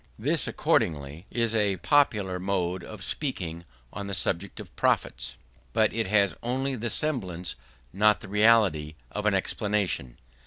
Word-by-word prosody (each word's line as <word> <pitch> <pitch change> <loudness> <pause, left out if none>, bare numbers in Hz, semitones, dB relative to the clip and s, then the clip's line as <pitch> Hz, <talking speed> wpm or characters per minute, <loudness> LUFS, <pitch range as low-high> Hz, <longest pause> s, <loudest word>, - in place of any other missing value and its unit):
This, - - 0
accordingly, 75 +3 -1
is 115 -2 0
a 105 -3 +1
popular 105 - +2
mode 90 -1 -2
of 110 -4 -9
speaking 85 - -4 0.3
on 100 +1 -6
the 100 - +7
subject 90 +2 +3
of - - -11
profits; - - 0 0.4
but 110 -2 +2
it 115 -2 -1
has 100 -1 +3
only 130 +3 -2
the 120 0 -3
semblance, 95 - 0 0.4
not 105 +2 +3
the - - -10
reality, 100 -8 +3 0.2
of 105 0 -2
an 105 - +3
explanation. 95 - -1
100 Hz, 145 wpm, -27 LUFS, 90-110 Hz, 0.4 s, the